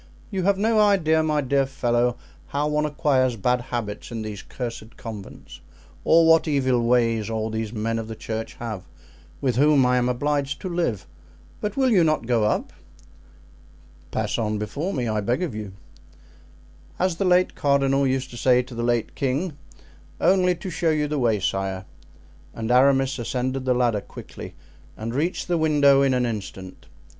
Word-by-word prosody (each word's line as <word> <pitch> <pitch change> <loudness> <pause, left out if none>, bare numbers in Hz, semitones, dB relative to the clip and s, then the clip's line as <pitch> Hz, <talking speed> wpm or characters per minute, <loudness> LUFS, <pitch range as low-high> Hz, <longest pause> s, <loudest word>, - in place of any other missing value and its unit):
You 190 -2 -1
have 200 0 +3
no 220 +2 +2
idea, 180 -7 +4
my 155 -1 +1
dear 135 0 +1
fellow, 120 -3 0 0.3
how 145 +1 -1
one 150 0 +1
acquires 140 -5 +1
bad 125 +4 +1
habits 115 -4 -5
in 115 -1 -5
these 105 -2 -6
cursed 115 -2 -7
convents, 110 -4 -9 0.4
or 165 0 +5
what 165 0 +5
evil 130 -5 +2
ways 115 -2 +2
all 110 0 -2
these 110 -1 -3
men 115 0 -2
of 110 - -5
the 110 - -6
church 110 +1 -5
have, 110 -5 -5 0.6
with 125 -4 0
whom 145 -1 +5
I 125 0 +3
am 125 0 +1
obliged 145 +2 -1
to 185 - -4
live. 165 - -1 0.5
But 210 +2 -4
will 260 -2 +3
you 185 -6 +5
not 155 -6 +1
go 115 -3 +2
up?" 105 - -1 1.4
"Pass - - -2
on 105 -1 -1
before 145 - -3
me, 125 -9 -2
I 110 -1 0
beg 120 - 0
of 160 -9 -3
you." 105 -2 -6 1.3
"As 185 -2 0
the 195 - 0
late 180 0 +3
cardinal 140 -1 +2
used 130 0 -1
to 120 - -9
say 125 0 +3
to 125 0 -12
the 115 - -4
late 120 -1 0
king, 140 +5 -1 0.6
'only 180 -1 +3
to 185 +2 -7
show 170 - 0
you 150 -1 +1
the 150 -1 -2
way, 115 -4 +2
sire.'" 95 0 -2 0.7
And 115 +1 -3
Aramis 135 +1 +4
ascended 130 +2 -2
the 125 -1 +2
ladder 120 -4 +1
quickly - - -10 0.4
and 115 +2 -4
reached 160 +7 -1
the 175 -2 +1
window 145 -3 +4
in 135 -2 +3
an 125 -1 +1
instant. 95 -4 -6
130 Hz, 175 wpm, -24 LUFS, 115-150 Hz, 1.4 s, or